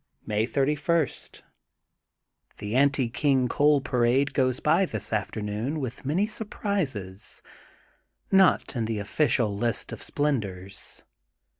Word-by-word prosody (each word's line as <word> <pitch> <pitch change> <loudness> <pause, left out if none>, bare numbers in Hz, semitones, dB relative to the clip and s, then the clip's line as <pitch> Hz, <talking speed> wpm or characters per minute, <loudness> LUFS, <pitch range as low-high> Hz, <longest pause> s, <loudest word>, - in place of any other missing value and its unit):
May 110 +1 0
31: 150 +3 +1 0.8
— - - -43
The 105 +2 -4
Anti 140 -1 +3
King 130 0 +2
Coal 145 +3 +3
Parade 125 +1 +1
goes 130 -2 +1
by 170 +5 +3
this 110 - -4
afternoon 110 - -2
with 130 -1 -6
many 175 +8 +2
surprises, 165 - -3 0.9
not 190 -6 +4
in 115 -2 -1
the 110 -1 -2
official 105 0 +1
list 115 +1 -1
of - - -7
splendors. 100 -10 -2
130 Hz, 115 wpm, -26 LUFS, 110-150 Hz, 0.9 s, not